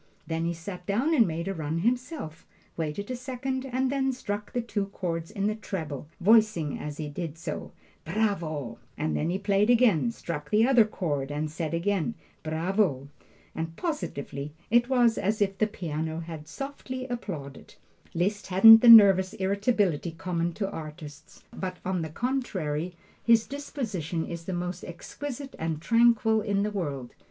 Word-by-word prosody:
'" - - -36
Then 165 0 -2
he 170 - 0
sat 180 +2 -8
down 245 +11 +1
and 235 -8 +5
made 170 +2 -3
a 195 - -1
run 160 -2 -3
himself, 245 - -2 0.3
waited 165 +8 -3
a - - -1
second, 260 +1 -4
and 260 +1 0
then 270 -1 +1
struck 210 -5 -5
the 245 - -1
two 215 -4 -2
chords 170 -4 -4
in 200 -2 -3
the 215 - +2
treble, 160 -10 -5 0.3
saying 170 -9 -4
as 150 0 -6
he 155 - -4
did 160 +1 -5
so, 165 - -5 0.3
"Bravo!" 160 - -2 0.2
and 155 +1 -1
then 155 - 0
he 180 - 0
played 200 +2 +2
again, 235 -5 +4
struck 150 -9 -6
the 215 +2 +4
other 250 -4 +6
chord 145 -10 -2
and 150 +1 -3
said 165 0 -3
again, 200 +4 0 0.3
"Bravo!" 160 -3 0 0.4
and 165 0 -4
positively, 145 - -4 0.2
it 240 +1 +4
was 240 -3 +3
as 210 +3 0
if 195 -2 0
the 215 - +3
piano 160 -5 -4
had 160 -2 -8
softly 260 - -6
applauded. 185 - -6 0.4
Liszt 200 +5 0
hasn't 225 +4 +9
the 240 - +7
nervous 195 -4 +9
irritability 195 - 0
common 170 0 -2
to 195 +3 -2
artists, 155 -3 -9
but 185 -1 -5
on 185 -1 0
the 160 - -4
contrary 180 - -2 0.3
his 230 -1 +5
disposition 220 - -4
is 170 -1 -7
the 190 - -4
most 180 0 -4
exquisite 270 - -7
and 160 -1 -2
tranquil 230 +2 +4
in 200 -1 0
the 210 - -1
world. 145 -11 -4
190 Hz, 165 wpm, -27 LUFS, 160-230 Hz, 0.4 s, hasn't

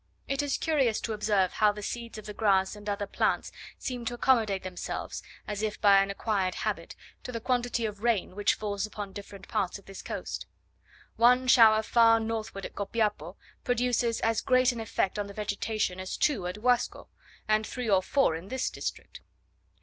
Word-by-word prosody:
It 275 0 0
is 285 -1 -1
curious 270 -9 +1
to 225 - -2
observe 205 -3 +1
how 210 -1 +4
the 210 0 -8
seeds 235 +1 -5
of 215 - -9
the 210 - -6
grass 195 -2 +2
and 210 0 -7
other 205 0 -1
plants 200 - 0 0.3
seem 250 -2 -4
to 240 - -2
accommodate 225 -6 +2
themselves, 185 -1 -5 0.3
as 210 -1 -3
if 215 -1 -2
by 200 -1 +6
an 195 - -1
acquired 195 -2 -1
habit, - - -3 0.3
to - - -7
the 230 - -3
quantity 245 -1 0
of 210 -1 -5
rain 225 -5 0
which 205 0 +2
falls 205 0 -3
upon 205 -2 -7
different 200 -1 -10
parts 190 0 -1
of 200 - -18
this 195 -1 -9
coast. - - -5 0.7
One 250 +2 +5
shower 220 -3 +7
far 230 0 +5
northward 220 -3 -4
at - - -7
Copiapo 205 -4 -1 0.3
produces 245 -1 +1
as 225 -1 +1
great 255 0 +4
an 240 - -6
effect 210 -2 -1
on 205 - -2
the 200 - -9
vegetation, 210 -2 -2
as 185 0 -4
two 220 -12 +1
at 185 +4 -6
Guasco, 245 0 +1 0.4
and 215 0 +2
three 250 -2 -4
or 195 -3 +4
four 270 - +2
in 165 +4 -7
this 260 +3 -2
district. - - -6
215 Hz, 190 wpm, -29 LUFS, 200-235 Hz, 0.7 s, shower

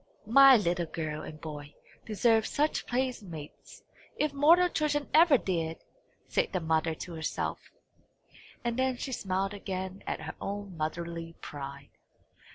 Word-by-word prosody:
"My 270 +4 +8
little 175 -4 0
girl 155 -1 -4
and 155 0 -9
boy 150 -2 -8 0.3
deserve 220 +1 +3
such 300 +2 0
playmates, 215 - -4 0.3
if 300 -1 0
mortal 330 +6 +6
children 300 -4 0
ever 315 -3 +7
did!" 165 -6 -2 0.5
said - - 0
the 185 - +1
mother 160 0 +1
to 175 - -7
herself; 160 -1 -3 0.9
and 240 +1 -1
then 260 -1 +1
she 265 - -5
smiled 195 -3 -1
again 190 -1 -5
at - - -2
her - - -6
own 200 -2 -5
motherly 165 +1 -4
pride. 140 -1 -8
190 Hz, 135 wpm, -30 LUFS, 160-255 Hz, 0.9 s, My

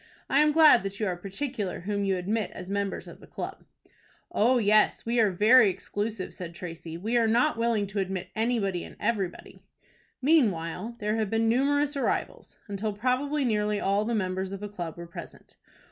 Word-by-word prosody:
I 275 - +4
am 300 0 +4
glad 310 -5 +7
that 195 +1 -5
you 215 - 0
are 185 -3 -1
particular 200 +2 -4
whom 200 +2 -2
you 195 -1 +1
admit 205 +4 -1
as 180 - -7
members 200 -1 -2
of - - -11
the - - -15
club." - - -7 0.7
"Oh, 245 +4 +3
yes, 215 -1 +3
we 235 +1 +1
are 220 -2 +5
very 210 +4 +6
exclusive," 205 +2 -4
said 170 -2 -8
Tracy. 165 -2 -7
"We 220 +7 0
are 230 -1 +3
not 240 +7 +3
willing 230 -3 +1
to 200 +1 -4
admit 190 -1 -3
anybody 220 -5 0
and - - -11
everybody." 205 -5 -3 0.6
Meanwhile 225 - +1
there 210 0 -1
had 215 -3 -1
been 225 +1 +1
numerous 285 +5 +2
arrivals, 275 - -2
until 205 +1 -3
probably 260 +6 0
nearly 210 -2 +1
all 200 +2 +1
the 230 +2 -1
members 190 -1 -2
of 195 - -5
the 205 - -5
club 175 -6 -6
were 170 - -7
present. 170 - -11
210 Hz, 185 wpm, -27 LUFS, 190-235 Hz, 0.7 s, glad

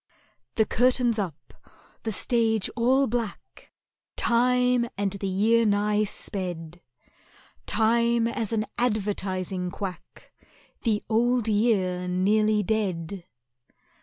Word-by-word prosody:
The 220 - +3
curtain's 245 -1 +2
up—the 195 +5 -8
stage 225 -1 +1
all 255 +4 +3
black— 230 -3 -5 0.5
Time 250 0 +2
and 200 -1 0
the 200 0 -4
year 220 +5 +3
nigh 210 0 +2
sped— 175 -4 -4 0.9
Time 235 +1 +2
as 230 -2 -2
an 215 -1 0
advertising 195 -5 -1
quack— 180 -2 -8 0.5
The 215 -3 0
Old 240 +1 +1
Year 200 -5 +1
nearly 210 +4 +2
dead. 190 -4 -2
215 Hz, 95 wpm, -26 LUFS, 190-235 Hz, 0.9 s, The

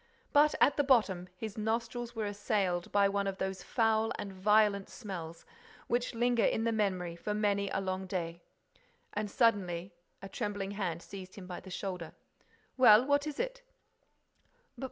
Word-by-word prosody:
But, 295 +1 +5
at 285 - +4
the 290 - +3
bottom, 210 -10 +3
his 220 +1 -6
nostrils 230 +2 -2
were 220 -1 -2
assailed 200 -4 -1
by 200 -1 +4
one 200 0 0
of 195 -1 -3
those 190 -1 -3
foul 225 -1 +1
and 200 -1 -6
violent 205 +1 +3
smells 170 -7 -7 0.4
which 240 0 -1
linger 240 0 +2
in 225 - +2
the 230 - +1
memory 185 -6 -1
for 210 +5 -3
many 200 -1 +1
a 195 - -1
long 190 0 -3
day. 170 -2 -4 0.7
And, 210 0 -2
suddenly, 195 -6 +1 0.3
a 195 - -8
trembling 205 -2 -3
hand 175 -5 -3
seized 185 -1 -9
him 195 - -9
by 180 -1 -6
the 190 - -12
shoulder. 180 -3 -5 0.6
"Well, 240 -2 +8
what 285 +1 +2
is 300 - -5
it?" - - -3
205 Hz, 160 wpm, -32 LUFS, 190-230 Hz, 0.7 s, Well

